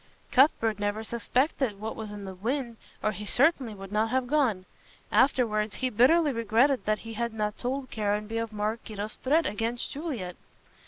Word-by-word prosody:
Cuthbert 230 Hz, -6 st, +4 dB
never 205 Hz, +1 st, -1 dB
suspected 235 Hz, 0 st, 0 dB
what 220 Hz, +1 st, -4 dB
was 220 Hz, -2 st, -6 dB
in 205 Hz, -1 st, -7 dB
the 190 Hz, -, -6 dB
wind 235 Hz, +4 st, -3 dB, 0.3 s
or 215 Hz, -, +2 dB
he 210 Hz, 0 st, -7 dB
certainly 260 Hz, -4 st, +2 dB
would 195 Hz, 0 st, -10 dB
not 215 Hz, +1 st, +1 dB
have 260 Hz, +1 st, +1 dB
gone. 245 Hz, -9 st, +1 dB, 0.5 s
Afterwards, 220 Hz, -6 st, +2 dB
he 255 Hz, -1 st, -1 dB
bitterly 290 Hz, +8 st, +5 dB
regretted 235 Hz, +3 st, +2 dB
that 215 Hz, 0 st, +2 dB
he 225 Hz, -, -6 dB
had 235 Hz, 0 st, -2 dB
not 210 Hz, -1 st, -1 dB
told 255 Hz, +1 st, -3 dB
Caranby 210 Hz, +1 st, -1 dB
of 230 Hz, -1 st, -3 dB
Maraquito's 215 Hz, 0 st, -3 dB
threat 310 Hz, +5 st, +2 dB
against 225 Hz, +3 st, -2 dB
Juliet. 260 Hz, -, -4 dB
225 Hz, 165 wpm, -28 LUFS, 210-255 Hz, 0.5 s, bitterly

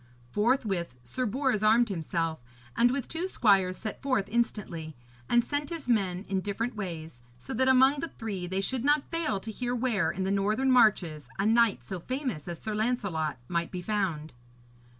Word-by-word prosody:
Forthwith 210 Hz, -, 0 dB
Sir 255 Hz, -, -2 dB
Bors 255 Hz, -1 st, 0 dB
armed 225 Hz, +2 st, +4 dB
himself, 165 Hz, -2 st, -2 dB, 0.4 s
and 240 Hz, -, +5 dB
with 265 Hz, 0 st, -2 dB
two 335 Hz, +3 st, -2 dB
squires 195 Hz, -, +3 dB
set 215 Hz, -, -6 dB
forth 255 Hz, -8 st, 0 dB
instantly; 190 Hz, -9 st, -2 dB, 0.3 s
and 240 Hz, 0 st, +4 dB
sent 290 Hz, +2 st, -2 dB
his 330 Hz, -5 st, -6 dB
men 195 Hz, -5 st, +1 dB
in 190 Hz, -1 st, 0 dB
different 225 Hz, +5 st, -3 dB
ways, 165 Hz, -, -6 dB, 0.2 s
so 125 Hz, -, -6 dB
that 260 Hz, +3 st, +2 dB
among 265 Hz, +2 st, +5 dB
the 330 Hz, -, -2 dB
three 200 Hz, -, -5 dB
they 190 Hz, +2 st, -1 dB
should 250 Hz, +4 st, -2 dB
not 290 Hz, 0 st, +2 dB
fail 330 Hz, -12 st, 0 dB
to 220 Hz, +3 st, -6 dB
hear 245 Hz, +3 st, -2 dB
where, 240 Hz, -5 st, +1 dB
in 190 Hz, 0 st, -2 dB
the 190 Hz, -, 0 dB
northern 215 Hz, +7 st, +2 dB
marches, 180 Hz, -, +3 dB
a 195 Hz, -, 0 dB
knight 225 Hz, -1 st, +3 dB
so 190 Hz, -2 st, -5 dB
famous 255 Hz, -, -4 dB
as 170 Hz, -1 st, -5 dB
Sir 220 Hz, -, -4 dB
Lancelot 200 Hz, -, -1 dB
might 170 Hz, -1 st, -1 dB
be 180 Hz, -1 st, -6 dB
found. 175 Hz, -8 st, -2 dB
210 Hz, 180 wpm, -29 LUFS, 180-250 Hz, 0.4 s, and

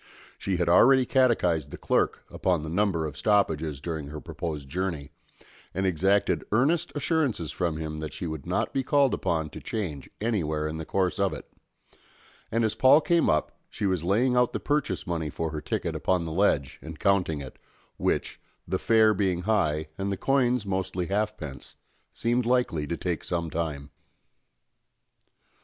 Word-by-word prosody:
She 95 Hz, -2 st, -1 dB
had 85 Hz, -1 st, 0 dB
already 130 Hz, +9 st, +6 dB
catechised 105 Hz, -, +2 dB
the -, -, -8 dB
clerk -, -, 0 dB
upon 90 Hz, -5 st, 0 dB
the 80 Hz, -, -5 dB
number 90 Hz, -2 st, +1 dB
of 75 Hz, -2 st, -5 dB
stoppages 80 Hz, -9 st, +1 dB
during 80 Hz, -1 st, -4 dB
her 75 Hz, +1 st, -7 dB
proposed 80 Hz, -3 st, -5 dB
journey, 80 Hz, -3 st, -3 dB, 0.6 s
and 95 Hz, +1 st, 0 dB
exacted 95 Hz, +3 st, +2 dB
earnest 155 Hz, +10 st, +2 dB
assurances 145 Hz, -, 0 dB
from 85 Hz, -4 st, -1 dB
him 80 Hz, -1 st, -4 dB
that 75 Hz, -1 st, -5 dB
she -, -, -6 dB
would 80 Hz, -4 st, -5 dB
not -, -, -1 dB
be 135 Hz, -, +1 dB
called 140 Hz, 0 st, +3 dB
upon 80 Hz, -2 st, -1 dB
to -, -, -8 dB
change 85 Hz, -, -4 dB
anywhere 80 Hz, -9 st, -1 dB
in 80 Hz, +1 st, -4 dB
the 80 Hz, -, -5 dB
course 95 Hz, -1 st, 0 dB
of 100 Hz, -1 st, +2 dB
it; -, -, -8 dB, 1.0 s
and 115 Hz, +1 st, +1 dB
as 110 Hz, -, 0 dB
Paul 130 Hz, +6 st, +6 dB
came 170 Hz, +1 st, +2 dB
up 75 Hz, 0 st, +1 dB, 0.2 s
she -, -, -4 dB
was 95 Hz, -4 st, 0 dB
laying 115 Hz, +8 st, +2 dB
out 125 Hz, -1 st, +3 dB
the -, -, -1 dB
purchase 150 Hz, 0 st, -1 dB
money 85 Hz, -4 st, -2 dB
for 80 Hz, +2 st, -3 dB
her 75 Hz, -1 st, -4 dB
ticket -, -, -2 dB
upon 90 Hz, -2 st, 0 dB
the 80 Hz, -, -4 dB
ledge 80 Hz, -6 st, +1 dB
and 80 Hz, 0 st, -8 dB
counting 90 Hz, -6 st, +2 dB
it, 65 Hz, -2 st, -9 dB, 0.4 s
which, -, -, -1 dB, 0.3 s
the -, -, -1 dB
fare 110 Hz, -1 st, +4 dB
being 95 Hz, -3 st, 0 dB
high 80 Hz, -8 st, +1 dB
and 100 Hz, +1 st, -1 dB
the 100 Hz, -, -2 dB
coins 125 Hz, -3 st, +2 dB
mostly 95 Hz, -2 st, -2 dB
halfpence, 100 Hz, -9 st, -3 dB, 0.4 s
seemed 120 Hz, +1 st, 0 dB
likely 120 Hz, -12 st, +1 dB
to 85 Hz, -, -3 dB
take 90 Hz, -3 st, -2 dB
some 85 Hz, -2 st, -2 dB
time. 75 Hz, -4 st, -3 dB
90 Hz, 170 wpm, -27 LUFS, 80-110 Hz, 1.0 s, already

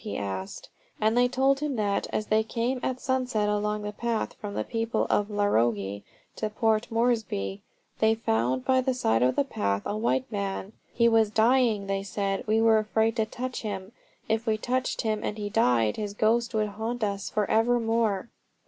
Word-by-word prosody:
he 215 Hz, -, -4 dB
asked. 95 Hz, -1 st, -5 dB, 0.3 s
And 220 Hz, +1 st, +2 dB
they 245 Hz, 0 st, +4 dB
told 270 Hz, +2 st, +2 dB
him 295 Hz, -2 st, -2 dB
that, 205 Hz, -3 st, 0 dB
as 215 Hz, -, -1 dB
they 215 Hz, +1 st, +3 dB
came 235 Hz, +3 st, -2 dB
at 255 Hz, +1 st, -2 dB
sunset 255 Hz, -5 st, 0 dB
along 210 Hz, 0 st, -1 dB
the 210 Hz, -, -3 dB
path 230 Hz, +1 st, -2 dB
from 205 Hz, -1 st, -7 dB
the -, -, -1 dB
people 225 Hz, -1 st, -1 dB
of 205 Hz, 0 st, +2 dB
Larogi 115 Hz, -, +1 dB, 0.4 s
to 215 Hz, -, -2 dB
Port 220 Hz, 0 st, +1 dB
Moresby, 220 Hz, -, 0 dB, 0.4 s
they 220 Hz, 0 st, +4 dB
found 125 Hz, -, 0 dB
by 260 Hz, 0 st, +3 dB
the 260 Hz, 0 st, 0 dB
side 115 Hz, -, +1 dB
of 125 Hz, +1 st, +3 dB
the -, -, +3 dB
path 100 Hz, -, -2 dB
a 205 Hz, -, -2 dB
white 235 Hz, +4 st, 0 dB
man. 200 Hz, 0 st, -3 dB, 0.2 s
"He 235 Hz, 0 st, +3 dB
was 225 Hz, -2 st, +4 dB
dying," 225 Hz, -1 st, +3 dB
they 195 Hz, 0 st, -1 dB
said. 195 Hz, 0 st, -3 dB
"We 220 Hz, +1 st, +3 dB
were 225 Hz, -1 st, +5 dB
afraid 220 Hz, +1 st, +1 dB
to 220 Hz, -1 st, +1 dB
touch 250 Hz, +3 st, -5 dB
him. 195 Hz, -2 st, -5 dB, 0.4 s
If 225 Hz, +1 st, -1 dB
we 215 Hz, -1 st, +2 dB
touched 255 Hz, +3 st, -1 dB
him 215 Hz, -2 st, -1 dB
and 210 Hz, -, -3 dB
he 205 Hz, -1 st, -4 dB
died, 120 Hz, -, +2 dB
his 205 Hz, -1 st, -4 dB
ghost 230 Hz, +2 st, +1 dB
would 215 Hz, -1 st, +1 dB
haunt 220 Hz, +3 st, -4 dB
us 200 Hz, -2 st, -2 dB
for 210 Hz, -2 st, 0 dB
evermore." 225 Hz, -2 st, +1 dB
215 Hz, 190 wpm, -27 LUFS, 200-235 Hz, 0.4 s, were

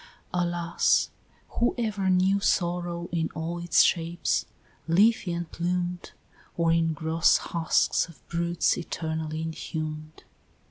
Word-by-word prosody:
Alas! 175 Hz, -1 st, +1 dB, 0.5 s
who 240 Hz, -, +2 dB
ever 210 Hz, -5 st, -1 dB
knew 185 Hz, +2 st, +3 dB
Sorrow 175 Hz, -2 st, 0 dB
in 165 Hz, -1 st, 0 dB
all 165 Hz, +2 st, -3 dB
its 175 Hz, 0 st, +4 dB
shapes, 170 Hz, 0 st, 0 dB, 0.4 s
leafy 195 Hz, +2 st, +3 dB
and 170 Hz, -1 st, -4 dB
plumed, 175 Hz, +1 st, -2 dB, 0.4 s
Or 165 Hz, -1 st, +2 dB
in 165 Hz, -1 st, +2 dB
gross 160 Hz, +1 st, +3 dB
husks 165 Hz, -1 st, +1 dB
of 170 Hz, -, -18 dB
brutes 170 Hz, +1 st, 0 dB
eternally 160 Hz, -2 st, -4 dB
inhumed? 155 Hz, -1 st, -5 dB
170 Hz, 110 wpm, -27 LUFS, 160-175 Hz, 0.5 s, its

